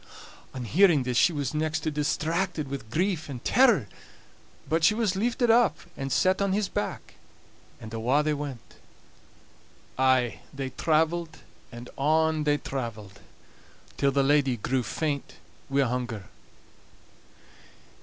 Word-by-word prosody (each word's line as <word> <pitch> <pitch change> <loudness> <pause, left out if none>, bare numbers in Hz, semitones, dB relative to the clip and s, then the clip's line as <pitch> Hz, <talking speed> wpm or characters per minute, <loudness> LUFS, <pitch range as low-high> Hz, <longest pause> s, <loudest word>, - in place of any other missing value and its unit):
On 130 - -4
hearing 165 - +4
this 125 -1 -2
she 175 - +5
was 145 -4 -3
next 155 +1 -1
to 155 - -2
distracted 155 +1 -1
wi' 140 - -2
grief 170 - -1
and 125 -4 -8
terror; 235 - +4 0.8
but 160 +1 0
she 210 - +5
was 215 -4 0
lifted 235 +3 +1
up 235 0 +4 0.2
and 135 0 -5
set 185 +6 +2
on 200 -1 +1
his 205 0 0
back, - - -4 0.7
and 110 +1 -10
awa' 125 +6 +1
they 155 0 +1
went. 140 -5 -7 1.2
Aye 130 -2 +2
they 135 -1 -5
traveled, 160 +2 0 0.3
and 120 +1 -9
on 155 +1 +2
they 145 0 +3
traveled, 110 -8 -6 0.8
till 140 -1 +2
the 140 0 +2
lady 135 -3 +2
grew 130 +4 -1
faint 140 - -3 0.3
wi' 140 +1 +2
hunger. 120 -4 -3
150 Hz, 135 wpm, -27 LUFS, 130-165 Hz, 1.2 s, she